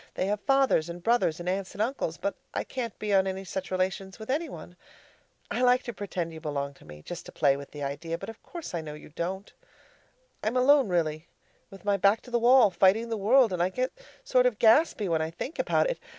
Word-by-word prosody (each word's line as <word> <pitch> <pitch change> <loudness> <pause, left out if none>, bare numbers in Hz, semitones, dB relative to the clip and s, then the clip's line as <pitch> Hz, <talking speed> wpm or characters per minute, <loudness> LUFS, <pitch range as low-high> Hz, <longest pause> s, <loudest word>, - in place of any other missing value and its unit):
They - - 0
have 205 +1 -1
fathers 270 - +3
and 170 0 -8
brothers 230 -9 +2
and 175 - -7
aunts 190 +1 -2
and 205 - -4
uncles; 225 - -2
but 200 - -2 0.2
I - - 0
can't 235 -5 -5
be 210 -1 -2
on 195 0 +4
any 190 0 -3
such 190 0 -5
relations 190 +1 -2
with 220 +2 -5
any 310 +3 -1
one. 175 - -10 0.8
I - - -1
like 250 0 +4
to 240 - -5
pretend 185 -5 -4
that - - -11
you 160 - -8
belong 140 -2 -3
to - - -19
me, 75 0 -12
just 175 - -7
to - - -9
play 140 -2 +3
with 140 0 -8
the 145 -1 -7
idea, 155 +4 -3
but - - -8
of 225 - -10
course 340 - -8
I 170 - -2
know 150 -1 -7
you 150 - -12
don't. 185 +6 -5 0.9
I'm 220 +4 0
alone, 270 +1 +5
really 160 -2 -1 0.4
with 195 +1 -14
my 200 -1 +2
back 200 +3 +3
to 250 - -14
the 240 - +2
wall 240 -2 +6
fighting 195 +6 +3
the 225 - -1
world 225 +1 +4
and 175 - -1
I 180 - +2
get 255 +6 -2 0.3
sort - - +3
of - - -1
gaspy 225 -2 +4
when 165 -2 +1
I 160 - -1
think 215 - -7
about - - +2
it. - - -3
195 Hz, 240 wpm, -28 LUFS, 170-240 Hz, 0.9 s, wall